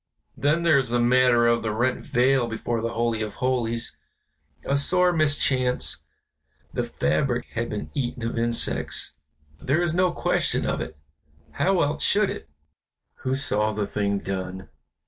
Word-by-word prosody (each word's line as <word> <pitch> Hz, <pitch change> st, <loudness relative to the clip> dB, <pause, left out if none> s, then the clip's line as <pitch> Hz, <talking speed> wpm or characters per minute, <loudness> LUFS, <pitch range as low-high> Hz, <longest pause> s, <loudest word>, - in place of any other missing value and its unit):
Then 150 Hz, +4 st, +1 dB
there 155 Hz, -4 st, +5 dB
is 130 Hz, -3 st, -2 dB
the 120 Hz, +1 st, +1 dB
matter 120 Hz, 0 st, +4 dB
of 120 Hz, 0 st, +3 dB
the 110 Hz, -, -2 dB
rent 120 Hz, +4 st, 0 dB
veil 125 Hz, 0 st, +2 dB
before 115 Hz, 0 st, -3 dB
the 115 Hz, +1 st, -3 dB
Holy 115 Hz, -1 st, 0 dB
of 105 Hz, -1 st, -4 dB
Holies; 120 Hz, -3 st, -1 dB, 0.7 s
a 140 Hz, -, +1 dB
sore 180 Hz, +5 st, +3 dB
mischance, 140 Hz, -5 st, +1 dB, 0.7 s
the -, -, -1 dB
fabric 120 Hz, -, 0 dB
had 115 Hz, +1 st, -2 dB
been 105 Hz, -, -5 dB
eaten 125 Hz, -4 st, -3 dB
of 115 Hz, -, -2 dB
insects, 115 Hz, 0 st, 0 dB, 0.5 s
there 145 Hz, +6 st, +1 dB
is 170 Hz, -2 st, 0 dB
no 180 Hz, 0 st, +2 dB
question -, -, 0 dB
of -, -, -1 dB
it, 80 Hz, -, -7 dB, 0.5 s
how 190 Hz, -2 st, +1 dB
else 145 Hz, +1 st, -2 dB
should 205 Hz, -1 st, +3 dB
it 80 Hz, -, -8 dB, 0.4 s
" -, -, -57 dB
"Who 130 Hz, +1 st, -1 dB
saw 110 Hz, -5 st, 0 dB
the 105 Hz, -1 st, -1 dB
thing 100 Hz, 0 st, -1 dB
done?" 95 Hz, -1 st, -5 dB
120 Hz, 160 wpm, -25 LUFS, 115-140 Hz, 0.7 s, there